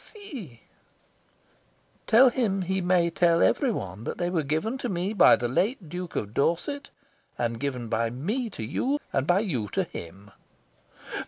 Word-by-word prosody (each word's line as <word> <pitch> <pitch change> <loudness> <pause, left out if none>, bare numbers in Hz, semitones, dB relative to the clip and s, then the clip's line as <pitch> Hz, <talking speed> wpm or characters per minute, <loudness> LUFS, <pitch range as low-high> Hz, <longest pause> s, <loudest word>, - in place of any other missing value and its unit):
"Tell 245 +4 +7
him 200 -7 0
he 190 +1 -1
may 175 -1 +2
tell 170 0 +3
every 275 - +3
one 95 - -5
that - - -4
they 175 0 -1
were 170 -3 +1
given 160 - -2
to 245 - -3
me 185 +3 -1
by 200 - +7
the 120 - -2
late 185 - -1
Duke 180 +1 -6
of 105 0 -3
Dorset, 180 - -1 0.5
and 115 -1 -1
given 130 -4 -3
by 115 0 0
me 205 - -2
to 115 - -7
you, 250 - 0 0.2
and 135 +1 0
by 180 +3 +4
you 135 - -2
to - - +1
him." 95 +5 -10
170 Hz, 160 wpm, -27 LUFS, 125-205 Hz, 0.5 s, Tell